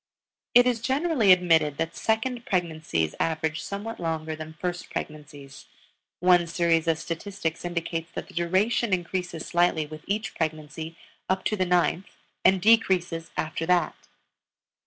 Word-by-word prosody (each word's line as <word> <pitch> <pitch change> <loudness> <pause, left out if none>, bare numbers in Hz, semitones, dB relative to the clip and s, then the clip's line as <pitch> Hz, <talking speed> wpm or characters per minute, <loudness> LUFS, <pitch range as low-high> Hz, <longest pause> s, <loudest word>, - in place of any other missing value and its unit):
It 245 0 +8
is 245 -3 +1
generally 265 - +3
admitted 165 -5 +4
that 165 0 -2
second 235 +2 -1
pregnancies 155 - -1
average 160 -1 -1
somewhat 205 +3 -5
longer 160 -1 -2
than 155 0 -9
first 180 -1 -4
pregnancies; 145 -3 -8 0.5
one 180 -1 +4
series 165 -1 +1
of 165 -1 +2
statistics 165 0 -4
indicates 165 -1 -3
that - - -5
the - - -15
duration 190 +6 +1
increases 180 -2 -2
slightly 170 -2 +2
with 155 +1 -10
each 210 -1 -2
pregnancy 160 +1 -4 0.3
up 190 0 0
to 215 - +1
the 185 -3 0
ninth 180 +1 +1 0.3
and 190 -1 +4
decreases 180 -7 +3
after 160 +1 -2
that. 180 -3 +2
170 Hz, 135 wpm, -26 LUFS, 160-190 Hz, 0.5 s, It